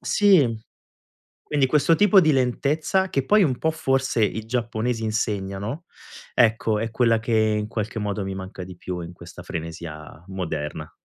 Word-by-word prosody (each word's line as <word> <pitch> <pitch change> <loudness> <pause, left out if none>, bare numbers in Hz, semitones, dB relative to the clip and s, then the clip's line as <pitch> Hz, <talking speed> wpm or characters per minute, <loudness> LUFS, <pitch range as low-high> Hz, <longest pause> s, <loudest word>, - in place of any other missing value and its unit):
Sì, 160 - +3 0.8
quindi 145 -3 +1
questo 150 +4 +3
tipo 205 +1 +6
di 155 -3 +3
lentezza, 145 +8 +1
che 135 -1 0
poi 210 +5 +4
un 130 -8 +1
po' 160 - +1
forse 135 -6 0
i 110 +1 -3
giapponesi 115 0 -2
insegnano, 105 - -2 0.5
ecco 110 -2 +3
è 115 +2 -2
quella 115 0 +2
che 115 +1 -2 0.2
in 105 - -2
qualche 110 0 -4
modo 105 -1 -2
mi 95 0 -4
manca 95 -1 -7
di 90 -1 -11
più, 90 0 -5
in 85 0 -7
questa 90 0 -12
frenesia 80 -2 -7
moderna. 80 -6 -4
115 Hz, 160 wpm, -24 LUFS, 95-135 Hz, 0.8 s, tipo